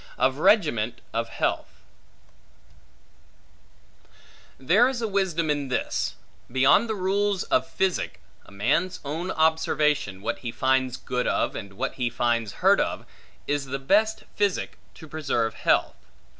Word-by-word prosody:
Of 130 Hz, +2 st, +1 dB
Regiment 155 Hz, -, +2 dB
Of 115 Hz, 0 st, -1 dB
Health -, -, -3 dB, 2.8 s
THERE 195 Hz, -, +4 dB
is 260 Hz, -2 st, -3 dB
a 230 Hz, -, -1 dB
wisdom 180 Hz, -6 st, 0 dB
in 145 Hz, -2 st, -2 dB
this; 125 Hz, -, -2 dB, 0.4 s
beyond 135 Hz, -, +4 dB
the 220 Hz, -, -1 dB
rules 195 Hz, 0 st, 0 dB
of 325 Hz, -1 st, +1 dB
physic: 190 Hz, -2 st, -1 dB, 0.2 s
a -, -, -17 dB
man's 140 Hz, -, 0 dB
own 160 Hz, +6 st, -3 dB
observation, 150 Hz, -, +1 dB
what -, -, -2 dB
he 120 Hz, -, -5 dB
finds 130 Hz, 0 st, +1 dB
good 125 Hz, -1 st, -2 dB
of, -, -, 0 dB
and 100 Hz, -2 st, -7 dB
what 135 Hz, +7 st, -3 dB
he 120 Hz, -, +2 dB
finds 120 Hz, -3 st, 0 dB
hurt -, -, +6 dB
of, -, -, -2 dB, 0.4 s
is 145 Hz, -1 st, -1 dB
the 135 Hz, +1 st, -3 dB
best 210 Hz, +11 st, +2 dB
physic 205 Hz, -3 st, -1 dB, 0.2 s
to 160 Hz, -, -12 dB
preserve 135 Hz, -8 st, -1 dB
health. -, -, +1 dB
145 Hz, 135 wpm, -25 LUFS, 125-190 Hz, 2.8 s, hurt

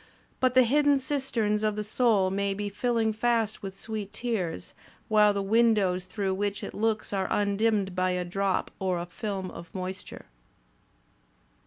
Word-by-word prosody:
But 255 Hz, -1 st, +2 dB
the 255 Hz, -, +8 dB
hidden 285 Hz, +3 st, +4 dB
cisterns 260 Hz, -6 st, 0 dB
of 215 Hz, -1 st, 0 dB
the 210 Hz, -, -2 dB
soul 210 Hz, -3 st, +2 dB
may 200 Hz, 0 st, 0 dB
be 205 Hz, 0 st, -3 dB
filling 225 Hz, +1 st, 0 dB
fast 225 Hz, -1 st, 0 dB
with 195 Hz, -1 st, -7 dB
sweet 215 Hz, -2 st, -5 dB
tears, 200 Hz, -9 st, -3 dB, 0.4 s
while 210 Hz, -1 st, +5 dB
the 200 Hz, -1 st, -1 dB
windows 200 Hz, -4 st, +2 dB
through 195 Hz, 0 st, -2 dB
which 200 Hz, +1 st, -2 dB
it -, -, -6 dB
looks 215 Hz, -1 st, -1 dB
are 190 Hz, -1 st, 0 dB
undimmed 205 Hz, -1 st, +1 dB
by 185 Hz, 0 st, +1 dB
a 180 Hz, 0 st, -1 dB
drop 195 Hz, +2 st, -1 dB
or 185 Hz, -2 st, 0 dB
a 170 Hz, -, -3 dB
film 195 Hz, 0 st, -5 dB
of 170 Hz, 0 st, -10 dB
moist 185 Hz, 0 st, -5 dB
ure." -, -, -11 dB
205 Hz, 165 wpm, -28 LUFS, 190-225 Hz, 0.4 s, the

